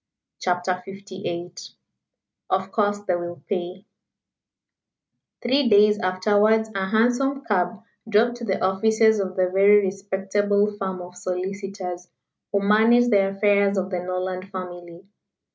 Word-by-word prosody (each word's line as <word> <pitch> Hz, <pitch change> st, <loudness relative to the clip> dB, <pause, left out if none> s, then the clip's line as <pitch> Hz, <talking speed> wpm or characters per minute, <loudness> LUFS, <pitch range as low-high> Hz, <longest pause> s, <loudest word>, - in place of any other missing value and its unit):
CHAPTER 180 Hz, 0 st, -1 dB
LVIII 190 Hz, -3 st, -7 dB, 0.7 s
OF 190 Hz, 0 st, -1 dB
COURSE 205 Hz, -1 st, 0 dB
THEY 185 Hz, -3 st, 0 dB
WILL 175 Hz, 0 st, -7 dB
PAY 185 Hz, 0 st, -4 dB, 1.6 s
THREE 260 Hz, +1 st, +2 dB
days 210 Hz, 0 st, +5 dB
afterwards 210 Hz, +4 st, +2 dB
a 190 Hz, -1 st, -2 dB
hansom 245 Hz, +5 st, +1 dB
cab 205 Hz, +2 st, -1 dB, 0.3 s
drove 225 Hz, +3 st, +3 dB
to 240 Hz, 0 st, -10 dB
the 190 Hz, -4 st, -1 dB
offices 220 Hz, +3 st, +3 dB
of 185 Hz, -1 st, -3 dB
the 185 Hz, -1 st, +1 dB
very 200 Hz, +1 st, +5 dB
respectable 200 Hz, +2 st, -1 dB
firm 190 Hz, -2 st, -4 dB
of 180 Hz, 0 st, -12 dB
solicitors 185 Hz, 0 st, -5 dB, 0.4 s
who 200 Hz, -, +1 dB
managed 235 Hz, +3 st, +4 dB
the 200 Hz, -2 st, +4 dB
affairs 200 Hz, 0 st, +2 dB
of 190 Hz, 0 st, -2 dB
the 180 Hz, -, -1 dB
Norland 185 Hz, +1 st, -4 dB
family. 175 Hz, -2 st, -8 dB
195 Hz, 125 wpm, -23 LUFS, 185-210 Hz, 1.6 s, days